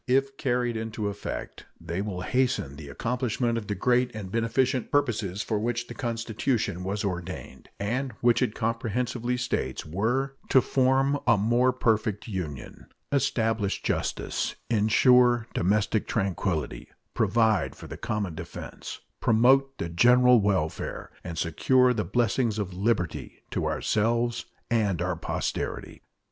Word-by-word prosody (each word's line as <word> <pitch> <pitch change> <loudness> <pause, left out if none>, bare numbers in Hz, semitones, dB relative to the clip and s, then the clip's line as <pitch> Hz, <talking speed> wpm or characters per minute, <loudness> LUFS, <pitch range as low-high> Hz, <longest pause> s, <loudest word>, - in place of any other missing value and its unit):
If 135 +2 +2
carried 120 -3 0
into 110 -2 -3
effect, 100 0 -6
they 85 +3 -3
will 100 -3 -4
hasten 125 - 0
the 75 -1 -9
accomplishment 120 - -1
of 110 -3 -4
the 105 - -2
great 125 +5 +2
and 100 -4 -6
beneficent 120 +3 +1
purposes 110 -9 0
for 110 -2 -1
which 120 +2 -1
the 120 - -8
Constitution 115 -4 -2
was 100 +3 -2
ordained, 90 -7 -5
and 125 +6 -1
which 120 +2 +2
it 105 - 0
comprehensively 120 +2 -1
states 95 - -2
were 120 - -1
"to 130 - +6
form 135 +2 +2
a 115 -3 +6
more 120 +5 +3
perfect 110 -4 0
Union, 80 - -6 0.2
establish 115 -7 0
justice, - - -1 0.2
insure 120 +2 +5
domestic 105 +3 +1
tranquillity, 95 -6 -2 0.3
provide 110 -5 +2
for - - -11
the - - -7
common 105 -6 -3
defense, 85 +1 -8 0.2
promote 135 +4 +4
the 85 - -3
general 125 +7 +5
welfare, 95 -6 -1
and 85 -2 -6
secure 125 +11 +3
the 110 -3 -1
blessings 115 +2 +1
of 100 -4 -3
liberty 95 -3 -2
to - - -1
ourselves 115 +2 0 0.3
and 105 -7 +2
our 90 0 -1
posterity." 85 - -4
115 Hz, 130 wpm, -27 LUFS, 100-125 Hz, 0.3 s, to